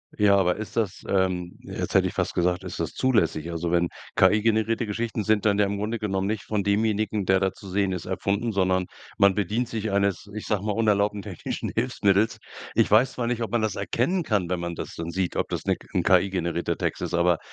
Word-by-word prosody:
Ja, 100 -1 +4
aber 90 0 +2
ist 110 - -7
das, 105 -4 -1
ähm 90 -2 0
jetzt - - -5
hätte - - +5
ich - - -5
fast - - -2
gesagt, 90 +1 +1
ist 90 -1 -6
das 85 -1 -2
zulässig? 85 - +1
Also 85 0 -2
wenn 85 0 +2 0.3
KI-generierte 110 +2 +3
Geschichten 110 +1 -2
sind 110 -1 +2
dann 100 -1 +3
ja 105 - +4
im 100 +1 -2
Grunde 110 +3 -2
genommen 95 -3 -1
nicht 105 0 -2
von 105 -2 -1
demjenigen, 105 0 +1
der 95 +1 +4
da 95 0 +1
zu 100 - -13
sehen 95 +1 0
ist, 90 - -5
erfunden, 100 +5 -1
sondern 95 -2 +1 0.3
man 100 -1 +5
bedient 110 +4 -1
sich 110 -1 -3
eines, 100 0 0
ich 110 - -5
sage 105 -2 -1
mal, 105 - 0
unerlaubten 105 -2 +1
technischen - - -5
Hilfsmittels. 110 -3 +2 0.4
Ich - - +3
weiß 115 +5 +5
zwar 120 - -2
nicht, 120 0 -1
ob 115 - -2
man 120 -2 +1
das 105 -3 -1
erkennen 175 +14 0
kann, 100 - 0
wenn 90 - 0
man 85 0 -4
das - - -6
dann 85 0 -5
sieht, 90 0 -2
ob - - -1
das - - -3
'ne - - +1 0.2
'n - - +2
KI-generierter 85 -3 +1
Text - - -2
ist, - - -2
aber 85 -1 +3
100 Hz, 220 wpm, -25 LUFS, 90-110 Hz, 0.4 s, hätte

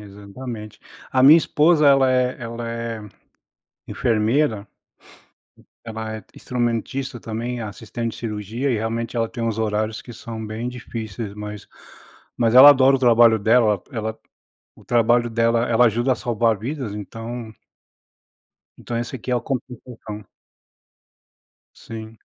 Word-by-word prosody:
Exatamente. 105 +2 -9 0.3
A 130 - +2
minha 150 +5 +9
esposa 155 -1 +3
ela 135 -2 +5
é 125 0 +1
ela 115 0 -5
é, 115 -1 -4 0.9
enfermeira. 110 0 0 1.2
Ela 110 -1 -5
é - - -15
instrumentista 125 +2 -3
também, 120 +2 -4
assistente 115 +1 -5
de - - -10
cirurgia, 110 +4 -3
e - - +1
realmente 115 +2 -3
ela 115 -1 0
tem 120 - -6
uns 115 -1 -1
horários 110 0 -1
que 120 - -11
são 110 0 -7
bem 110 +3 -4
difíceis, 115 -4 -6 1.0
mas 115 -1 +1
ela 135 +3 +11
adora 135 -1 +5
o - - -4
trabalho 120 -2 +5
dela, 110 -2 +3
ela 110 -3 -4 0.6
O - - -18
trabalho 120 0 +3
dela 115 +1 +1
ela 120 +1 +4
ajuda 120 +4 +1
a - - -1
salvar 115 -1 +1
vidas, 125 -1 -5
então 115 +2 -7 1.3
Então, 120 -2 -4
esse 120 +3 -4
aqui 125 - -7
é 125 - +2
o - - -1
compensação. 120 -4 -7 1.5
Sim. 110 0 -10
115 Hz, 130 wpm, -22 LUFS, 110-125 Hz, 1.5 s, ela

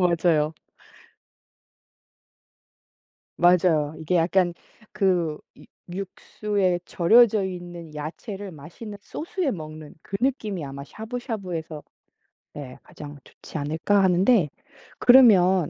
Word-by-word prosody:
맞아요. 160 -2 +1 2.8
맞아요. 170 -4 +3
이게 170 +3 0
약간 175 +1 +2 0.4
그 180 -7 +1 0.2
유 - - -16 0.4
육수에 195 -1 -2
절여져 215 +3 +4
있는 175 -3 -7
야채를 190 +6 -7
맛있는 170 +8 -10
소스에 330 - -3
먹는 155 -4 -8
그 195 - -4
느낌이 220 - -1
아마 140 0 -7
샤브샤브에서 195 - -6 0.7
네 135 -3 -9
가장 145 -1 -11
좋지 - - -10
않을까 160 +7 +1
하는데. 185 0 +4 0.5
그러면 190 - +6
180 Hz, 220 characters per minute, -24 LUFS, 155-205 Hz, 2.8 s, 그러면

